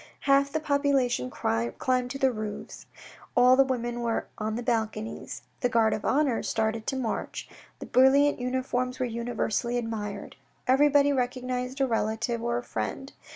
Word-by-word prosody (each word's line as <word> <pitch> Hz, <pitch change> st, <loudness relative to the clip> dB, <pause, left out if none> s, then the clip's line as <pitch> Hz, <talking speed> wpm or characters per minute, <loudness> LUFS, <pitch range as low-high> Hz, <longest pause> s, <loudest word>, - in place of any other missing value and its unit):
Half 280 Hz, 0 st, +3 dB
the 315 Hz, -, 0 dB
population 280 Hz, -, +1 dB
climbed 115 Hz, 0 st, -1 dB
on 250 Hz, -1 st, +2 dB
to 275 Hz, -, -4 dB
the 265 Hz, -1 st, +3 dB
roofs. 215 Hz, -2 st, -7 dB, 0.5 s
All 250 Hz, +1 st, +7 dB
the 270 Hz, -, +6 dB
women 240 Hz, -2 st, -2 dB
were 230 Hz, -1 st, -1 dB
on 215 Hz, 0 st, -2 dB
the 240 Hz, -, -3 dB
balconies. 220 Hz, -2 st, -3 dB, 0.2 s
The 245 Hz, -, +1 dB
guard 230 Hz, -2 st, +3 dB
of 215 Hz, -, -3 dB
honour 275 Hz, -4 st, +2 dB
started 220 Hz, 0 st, -1 dB
to 270 Hz, -, -1 dB
march, 250 Hz, -4 st, -3 dB, 0.3 s
The -, -, -8 dB
brilliant 275 Hz, +3 st, +4 dB
uniforms 250 Hz, 0 st, -1 dB
were 255 Hz, -, +1 dB
universally 235 Hz, 0 st, -2 dB
admired; 210 Hz, -4 st, -5 dB, 0.3 s
everybody 285 Hz, +2 st, +4 dB
recognised 250 Hz, 0 st, -2 dB
a -, -, +5 dB
relative 225 Hz, 0 st, -1 dB
or 235 Hz, 0 st, 0 dB
a 245 Hz, -, -4 dB
friend. 115 Hz, -, -4 dB
245 Hz, 155 wpm, -27 LUFS, 225-265 Hz, 0.5 s, All